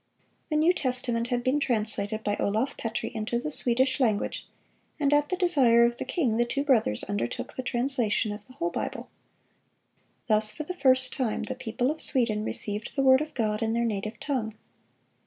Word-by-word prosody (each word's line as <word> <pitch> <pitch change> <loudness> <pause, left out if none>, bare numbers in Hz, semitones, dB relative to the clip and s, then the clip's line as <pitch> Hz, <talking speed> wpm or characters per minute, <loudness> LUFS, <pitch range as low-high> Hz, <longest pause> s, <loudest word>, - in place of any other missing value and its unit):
The 305 - -1
New 320 +4 +4
Testament 245 -5 -1
had 245 -1 -1
been 265 +3 +1
translated 215 -4 -1
by 205 - 0
Olaf 220 +7 -1
Petri 225 0 -4
into 225 +2 -2
the 300 +6 -3
Swedish 260 +1 +3
language, 220 -6 0 0.5
and 290 -1 +2
at 295 0 +3
the 370 - 0
desire 270 -11 +4
of 235 0 -1
the - - -4
king 255 -11 0
the 240 - +4
two 275 +4 -2
brothers 230 - +2
undertook 205 -12 -3
the - - -4
translation 240 -4 0
of 210 0 -8
the 255 - -16
whole 340 +5 -2
Bible. - - -5 1.2
Thus 215 -2 +2
for 305 - -6
the 360 - -5
first 260 -6 +2
time 250 -6 -2
the 260 - -4
people 250 +1 -2
of 315 - -4
Sweden 230 -6 +1
received 210 -1 -3
the 275 - +1
word 260 +1 +6
of 305 0 -6
God 215 -3 -1
in 225 0 0
their 235 0 +1
native 215 0 -3
tongue. 245 -7 -2
245 Hz, 190 wpm, -27 LUFS, 220-275 Hz, 1.2 s, word